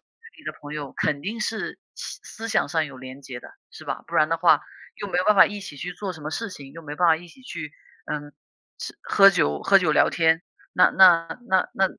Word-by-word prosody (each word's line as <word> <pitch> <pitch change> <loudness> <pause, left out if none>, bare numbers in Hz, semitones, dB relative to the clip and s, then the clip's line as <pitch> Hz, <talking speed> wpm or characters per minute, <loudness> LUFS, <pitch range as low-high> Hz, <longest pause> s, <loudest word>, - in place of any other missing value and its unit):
距 460 -7 -20
离 - - -18
的 - - -3
朋 145 +1 -8
友， 145 -3 -6
肯 140 - 0
定 210 +9 -5
是 220 0 -3 0.2
思 - - -8
思 225 +1 -8
想 - - +1
上 160 -3 +1
有 140 - -11
联 130 +1 -10
结 130 -3 -8
的 - - -13 0.2
是 - - -12
吧？ - - -4
不 - - -10
然 155 +1 +3
的 165 - +1
话 165 -3 +4 0.3
又 205 - -6
没 180 - -1
办 210 -1 +5
法 - - +9
一 205 -1 -5
起 185 -6 -9
去 175 +5 -5
做 190 0 -5
什 160 - -12
么 155 - -5
事 230 +7 -3
情， 140 -6 -11
又 165 - -10
没 150 -2 -7
办 175 +1 +3
法 160 -1 +5
一 175 - -13
起 260 +10 -18
去， 160 -10 -7 0.4
嗯 145 0 -5 0.5
是， - - -7
喝 195 0 +6
酒 75 - +1
喝 195 - +5
酒 170 -5 +1
聊 - - +4
天， 165 -1 +2 0.3
那 180 - +5
那 175 -1 +5
那 190 -5 +2
那 195 - +2
165 Hz, 265 characters per minute, -24 LUFS, 150-195 Hz, 0.5 s, 法